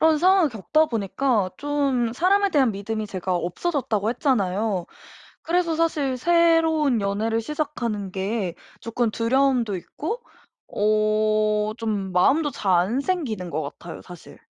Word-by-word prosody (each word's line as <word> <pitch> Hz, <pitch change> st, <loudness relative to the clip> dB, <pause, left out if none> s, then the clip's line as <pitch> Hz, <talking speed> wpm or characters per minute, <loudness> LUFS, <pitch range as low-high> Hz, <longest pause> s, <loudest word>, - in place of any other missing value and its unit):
러 320 Hz, 0 st, +5 dB
런 310 Hz, -, +2 dB
상황을 370 Hz, 0 st, +4 dB
겪다 250 Hz, -, +1 dB
보니까 225 Hz, -2 st, 0 dB
좀 280 Hz, -5 st, 0 dB
사람에 390 Hz, +8 st, +2 dB
대한 265 Hz, -, +3 dB
믿음이 215 Hz, +2 st, -4 dB
제가 185 Hz, -2 st, -3 dB
없어졌다고 215 Hz, -, -1 dB
했잖아요. 210 Hz, -, 0 dB, 0.6 s
그래서 335 Hz, -1 st, 0 dB
사실 300 Hz, -5 st, 0 dB
새로운 325 Hz, -4 st, +3 dB
연애를 215 Hz, +3 st, -1 dB
시작하는 235 Hz, -7 st, -3 dB
게 190 Hz, -1 st, -2 dB, 0.3 s
조금 230 Hz, 0 st, -1 dB
두려움도 240 Hz, -2 st, +1 dB
있고 350 Hz, -, -5 dB, 0.5 s
어 215 Hz, 0 st, +1 dB
좀 205 Hz, -5 st, -3 dB
마음도 285 Hz, -, +3 dB
잘 200 Hz, -8 st, -1 dB
안 210 Hz, +10 st, +1 dB
생기는 260 Hz, -, -2 dB
것 155 Hz, 0 st, -2 dB, 0.2 s
같아요. 170 Hz, -1 st, -9 dB
사실. 175 Hz, -2 st, -13 dB
230 Hz, 290 characters per minute, -23 LUFS, 205-300 Hz, 0.6 s, 러